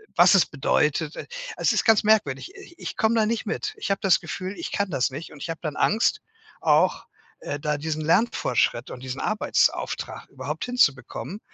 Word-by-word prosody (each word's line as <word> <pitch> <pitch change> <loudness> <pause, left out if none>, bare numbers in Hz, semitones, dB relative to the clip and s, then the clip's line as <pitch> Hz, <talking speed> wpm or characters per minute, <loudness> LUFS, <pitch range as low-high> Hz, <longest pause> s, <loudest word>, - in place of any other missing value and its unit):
was 175 +1 +7
es 190 - +5
bedeutet. 150 +2 0
E - - -7 0.3
es - - +2
ist - - +1
ganz 220 -2 +5
merkwürdig. 215 - +2
Ich 350 -3 -14
ich - - -6
komme 220 +1 +2
da 220 -2 +3
nicht 230 0 -1
mit. 425 - -3
Ich 425 - -3
habe 195 - +1
das 195 -4 +4
Gefühl, 185 +1 -5
ich 170 - -5
kann 200 -1 -1
das 125 - +1
nicht, 145 +5 -7
und 145 - -13
ich - - -5
habe 165 - -6
dann 155 -3 -4
Angst 220 +3 +2 0.4
auch, - - +2 0.3
äh, 145 - -5
da 150 0 -1
diesen 155 +1 -3
Lernfortschritt 160 - +1
und 125 - -8
diesen 130 +1 -5
Arbeitsauftrag 215 0 0
überhaupt - - -5
hinzubekommen 170 - 0
175 Hz, 190 wpm, -25 LUFS, 145-220 Hz, 0.4 s, was